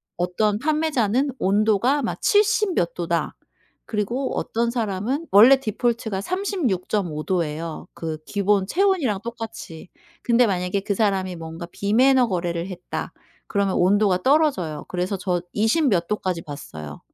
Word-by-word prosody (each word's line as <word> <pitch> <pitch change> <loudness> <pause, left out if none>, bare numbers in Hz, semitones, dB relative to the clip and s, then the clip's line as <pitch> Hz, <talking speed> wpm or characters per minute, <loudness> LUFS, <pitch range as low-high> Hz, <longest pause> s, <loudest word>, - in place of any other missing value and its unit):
어떤 205 +4 0
판매자는 285 -4 +1
온도가 215 +8 +2
막 - - -3
'70 420 -2 +3
몇 170 -1 0
도다.' 170 -1 -2 0.5
그리고 235 +5 -2
어떤 235 +1 -1
사람은 235 - -2
원래 230 +7 +8
디폴트가 225 -3 -2
36.5 210 - -2
도예요, 165 -3 -3
그 160 -2 -5
기본 200 -1 +1
체온이랑 340 - +1
똑같이. 225 -8 -8 0.3
근데 240 0 +3
만약에 185 0 -1
'그 200 - -1
사람이 190 -3 0
뭔가 165 +1 -7
비매너 250 +5 +3
거래를 175 -2 -2
했다.' 180 -2 -6 0.4
그러면 200 -2 0
온도가 190 0 +3
떨어져요. 260 - +1
그래서 185 +2 -2
저 180 -2 -1
20 230 +9 +2
몇 175 -5 +1
도까지 185 -5 -2
봤어요. 80 - -9
205 Hz, 280 characters per minute, -23 LUFS, 180-245 Hz, 0.5 s, 원래